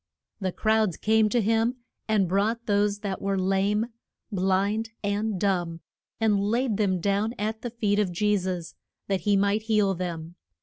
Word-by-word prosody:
And 185 -2 -2
crowds 220 -5 +2
came 220 0 +3
to 240 - +2
him, 225 +3 +2 0.3
and 210 -4 +2
brought 215 +6 0
those 205 0 +1
that 195 -2 -3
were 195 0 0
lame, 195 +3 +1 0.5
blind, 200 +3 +1
and 205 0 -1
dumb, 175 -4 0 0.4
and 215 -3 +3
laid 225 +2 0
them 190 -4 +1
down 205 +5 0
at 220 +1 -3
the 240 - -3
feet 210 -3 0
of 200 -4 +1
Je 210 +4 +2
sus, 180 -3 -3 0.3
that 195 -2 0
he 200 +2 +3
might 200 +2 +2
heal 210 -3 +2
them. 170 -2 -5
205 Hz, 165 wpm, -26 LUFS, 190-220 Hz, 0.5 s, came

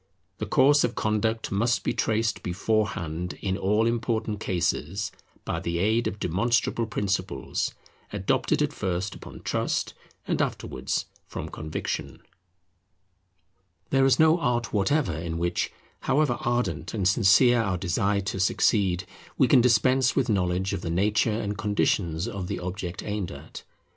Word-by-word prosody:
The 110 - -3
course 145 +7 +5
of 120 0 0
conduct 110 +1 0
must 115 +4 +1
be - - 0
traced 110 -1 0
beforehand 90 -3 -1
in 95 -1 -1
all 105 +3 +2
important 115 -2 -1
cases 90 0 -1 0.3
by - - -2
the 85 0 -2
aid 110 +6 +2
of 100 - -4
demonstrable 115 +5 0
principles, 100 -3 -2 0.4
adopted - - +1
at - - -1
first 95 +1 -2
upon - - -11
trust, - - -1 0.3
and - - +1
afterwards 65 0 -2 0.2
from - - -6
conviction. 75 0 -4 1.7
There 135 0 +4
is 130 -2 +4
no 160 +2 +5
art 120 -5 -1
whatever 105 - +1
in 80 +1 -4
which, 85 +1 -1 0.3
however 145 -4 +1
ardent 100 -8 -1
and 95 -4 +1
sincere 115 +5 +5
our 95 -4 -1
desire 100 +3 0
to 95 0 -4
succeed, 95 -2 +2 0.3
we - - +5
can 125 - +6
dispense 125 +2 +3
with 130 -3 +1
knowledge 95 -2 0
of - - -3
the 85 - -4
nature 105 +5 +1
and 105 -2 -3
conditions 100 -4 0
of 100 -6 -4
the - - -3
object 90 0 -5
aimed 105 -3 -3
at. 70 +3 -10
105 Hz, 145 wpm, -26 LUFS, 90-115 Hz, 1.7 s, can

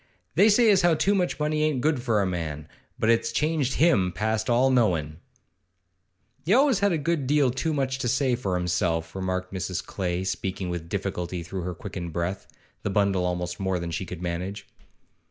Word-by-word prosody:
They 200 +8 +5
say 220 +1 +5
as 195 - +4
how 175 -2 +4
too 200 +5 +2
much 180 -5 0
money 150 0 0
ain't 155 -4 +1
good 150 -3 +1
for 115 -5 +1
a - - 0
man, 80 -5 -4 0.3
but 110 - +3
it's 115 0 +1
changed 150 -1 0
him 120 - +3
past 110 +4 -1
all 125 +3 +4
knowin'.' 85 - +1 1.3
'He 185 +8 +3
always 265 -5 +4
had 200 0 +3
a 165 - +1
good 150 -2 -1
deal 145 -2 +3
too 160 +6 -1
much 135 -3 -1
to 125 - -1
say 130 +1 +2
for 100 -7 -2
himself,' 85 -2 -1
remarked 95 0 -3
Mrs. 95 -1 -3
Clay, 90 -1 -2
speaking 95 -1 -3
with 85 -2 -5
difficulty 90 -3 -3
through 90 +2 -5
her 90 0 -4
quickened 90 -4 -6
breath, 85 +3 -3 0.3
the - - -2
bundle 100 -2 +1
almost 90 0 -3
more 95 -1 0
than 85 -1 -4
she 85 +3 -3
could 90 0 -7
manage. 90 +4 -4
100 Hz, 190 wpm, -26 LUFS, 90-140 Hz, 1.3 s, They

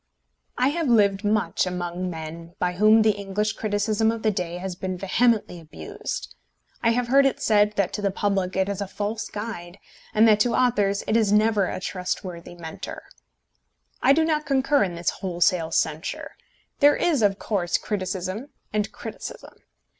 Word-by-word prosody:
I 255 +2 +3
have 325 +1 -1
lived 205 -4 +3
much 210 -2 +1
among 180 0 -3
men 165 +1 -8
by 180 0 0
whom 215 +4 +5
the 215 - +5
English 205 +1 -2
criticism 215 +1 0
of 230 -1 -6
the 215 - +3
day 175 -3 -3
has 185 0 -5
been 185 0 -4
vehemently 205 -1 +1
abused. 80 - -7 0.5
I 230 - +3
have 240 +1 0
heard 275 +2 +6
it 270 -2 +1
said 210 -1 +3
that 200 -3 0
to 210 - -3
the 200 - +1
public 195 -1 -1
it 190 0 +1
is 200 -1 -3
a 200 - -2
false 210 +3 -4
guide, 205 -5 -6 0.3
and 220 +2 +5
that 210 -1 +5
to 235 +2 +2
authors 205 -6 +2
it 215 - +1
is 220 -3 +3
never 210 -2 +3
a - - -4
trustworthy 180 -2 -5
Mentor. 160 -2 -8 1.0
I 260 - +5
do 320 +3 +4
not 305 -2 0
concur 275 +1 +3
in 180 -3 -3
this 170 0 0
wholesale 175 -2 0
censure. 160 +2 -2 0.5
There 290 0 +6
is, 325 -8 +1
of 200 -2 +3
course, 190 -6 0
criticism 190 +3 -3 0.3
and 210 -1 0
criticism. - - -8
205 Hz, 170 wpm, -24 LUFS, 180-225 Hz, 1.0 s, heard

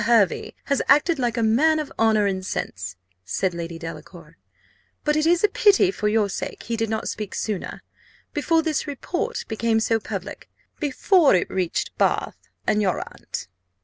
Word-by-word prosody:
Hervey 225 -5 +2
has 280 - 0
acted 295 +2 +4
like 240 -2 0
a 230 - +1
man 290 +9 +4
of 305 -2 -3
honour 220 -2 +4
and 190 -1 -1
sense," 185 - -4 0.3
said 175 - -1
Lady 170 -1 -5
Delacour; 165 0 -10 0.7
"but 300 0 +2
it 310 +1 +2
is 345 +2 +3
a - - +7
pity, 400 -1 +4
for 210 - -2
your 210 -1 +2
sake, 195 - -5
he 230 +2 -2
did 225 -1 -1
not 220 0 -2
speak 210 -2 -4
sooner 210 -5 -4 0.5
before 320 +2 +2
this 310 -1 -1
report 355 - -3
became 225 0 +1
so 225 0 +1
public - - -7 0.3
before 300 - +4
it 180 - 0
reached 185 -3 -1
Bath, - - +1 0.3
and 210 - +2
your 190 -3 +1
aunt. - - -7
225 Hz, 170 wpm, -23 LUFS, 205-310 Hz, 0.7 s, a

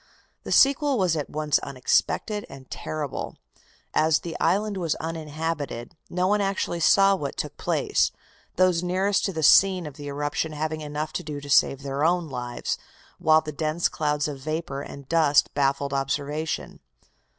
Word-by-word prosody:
The - - -5
sequel 275 0 +4
was 185 -5 +2
at 150 -3 -3
once 150 0 +1
unexpected 140 - 0
and 135 -1 -12
terrible. 150 -3 -4 0.6
As 155 0 +3
the 170 - -6
island 205 +1 +1
was 170 -4 0
uninhabited, 155 -4 -4
no 180 +1 0
one 205 +2 +2
actually 195 -3 -1
saw 195 +4 +5
what 145 -7 -5
took - - -4
place, - - +1 0.4
those 180 -2 +3
nearest 190 +3 +1
to 195 - 0
the 160 -3 -3
scene 185 +3 +6
of 150 -1 -8
the 145 -1 -7
eruption 145 +2 -2
having 155 +1 -3
enough 150 +1 -4
to - - -3
do 150 -2 -5
to 145 0 -7
save 135 0 +4
their 140 +1 -2
own 175 +1 +2
lives, 125 -2 -4 0.4
while 155 0 +5
the 155 - -6
dense 155 +3 0
clouds 150 -1 0
of 145 -2 -6
vapor 155 -1 -4
and 140 -1 -10
dust 155 -3 +3
baffled 140 0 0
observation. 145 +3 -2
155 Hz, 160 wpm, -25 LUFS, 145-175 Hz, 0.6 s, scene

